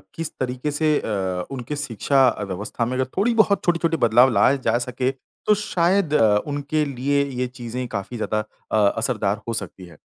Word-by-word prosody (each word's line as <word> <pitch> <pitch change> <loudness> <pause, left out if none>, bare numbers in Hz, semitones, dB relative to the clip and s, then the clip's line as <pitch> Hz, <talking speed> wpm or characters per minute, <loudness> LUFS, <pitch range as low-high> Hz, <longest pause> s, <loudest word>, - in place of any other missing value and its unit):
किस 165 -1 -4
तरीके 130 +3 -2
से 155 +2 0
अ, 95 -4 -2
उनके 135 +2 -5
शिक्षा 135 0 +2
अ, 115 - -1
व्यवस्था 100 +4 -3
में 125 - -3
अगर 130 0 +1
थोड़ी 225 +5 +2
बहुत 215 -3 +3
छोटी-छोटे 165 -1 +1
बदलाव 120 0 +5
लाए 135 +4 +4
जा 115 +1 +3
सके, 125 +1 -1 0.3
तो 210 - +5
शायद 185 -4 +1
अ, 110 -7 +4
उनके 145 +1 -1
लिए 140 +1 0 0.2
ये 125 - 0
चीज़ें 125 0 -6
काफ़ी 115 +1 -5
ज़्यादा 110 -1 -1 0.3
अ, - - +2 0.2
असरदार 110 -4 -1
हो 115 - -2
सकती 95 -4 -6
हैं। 85 - -15
125 Hz, 185 wpm, -22 LUFS, 115-150 Hz, 0.3 s, बदलाव